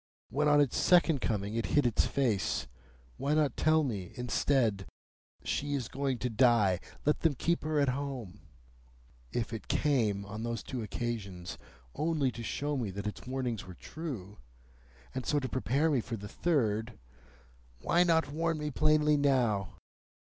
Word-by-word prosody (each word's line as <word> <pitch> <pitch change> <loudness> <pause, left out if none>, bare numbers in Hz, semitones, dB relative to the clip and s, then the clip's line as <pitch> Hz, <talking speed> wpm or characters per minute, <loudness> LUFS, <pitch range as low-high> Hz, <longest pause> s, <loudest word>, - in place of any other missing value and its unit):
When 150 +3 +1
on 145 0 +5
its 145 -3 +2
second 170 -6 +4
coming 105 -1 -1
it 115 0 -1
hid 145 - +5
its 120 - +2
face, 105 - 0 0.5
why 145 +2 0
not 150 -2 +2
tell 155 0 +3
me, 100 -10 -4
instead, 125 -5 +1 0.6
'She 145 0 -1
is 130 -5 -2
going 135 -2 -1
to 125 - -2
die. 110 -6 +4 0.3
Let 150 - +2
them 160 -4 +2
keep 170 +7 0
her 155 -1 0
at 140 -2 +3
home'? 125 -7 -4 0.9
If 120 -1 -2
it 110 - -6
came, 110 -9 +1
on 105 +2 -6
those 115 0 -3
two 130 -3 -4
occasions, 100 -5 -4 0.3
only 155 -4 0
to 120 - -8
show 145 +5 -2
me 120 -6 -2
that 100 +2 -6
its 105 +3 -5
warnings 125 -6 -3
were 90 - -9
true, 115 - -7 0.7
and 130 - -3
so 145 - +1
to 130 - -3
prepare 135 +5 +1
me 135 -5 +2
for 115 0 -5
the 105 0 -8
third, 110 -7 0 0.8
why 175 - +3
not 160 -4 +2
warn 165 +1 0
me 150 0 -3
plainly 150 +1 +3
now? 120 -10 +1
130 Hz, 160 wpm, -31 LUFS, 110-150 Hz, 0.9 s, on